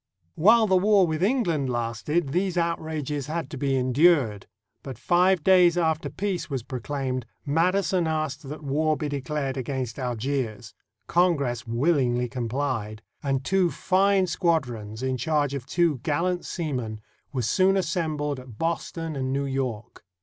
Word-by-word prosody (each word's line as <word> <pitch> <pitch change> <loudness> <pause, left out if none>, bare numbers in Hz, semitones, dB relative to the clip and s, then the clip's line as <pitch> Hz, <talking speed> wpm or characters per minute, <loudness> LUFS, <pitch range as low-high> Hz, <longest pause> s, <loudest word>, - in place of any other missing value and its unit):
301 175 +7 +4
NORTHERN 235 - +8
AFRICA - - +2
While 220 - +3
the 190 -1 +3
war 205 -3 +5
with 160 0 -2
England 175 - +1
lasted, 120 +7 -1
these 180 +4 0
outrages 155 -4 -2
had 165 +1 -4
to - - -5
be 135 -1 +1
endured; 130 - +3 0.3
but, 135 -2 -8
five 180 -1 +3
days 180 -2 +5
after 160 -2 0
peace 180 -6 -3
was 135 -5 -3
pro 130 0 -5
claimed, 130 -2 -3 0.2
Madison 180 +3 +1
asked 155 -3 -3
that 150 +1 -7
war 155 +2 +1
be 150 - -3
declared 140 -1 -3
against 130 -2 -3
Algiers. 120 -3 -3 0.3
Congress 140 -10 +1
willingly 125 -1 +1
complied, 120 -3 -3 0.2
and 135 -3 -1
two 190 +2 +2
fine 190 +2 +2
squadrons, 130 - -1
in 130 -1 0
charge 145 +2 0
of 135 -2 -5
two 170 -6 +1
gallant 175 +7 -1
seamen, 125 - -3 0.3
were 130 -4 -2
soon 190 - +3
assembled 155 -5 -1
at 125 -4 -12
Boston 165 0 -3
and 130 -1 -2
New 140 +1 0
York. 130 -5 -4
145 Hz, 155 wpm, -25 LUFS, 130-170 Hz, 0.3 s, NORTHERN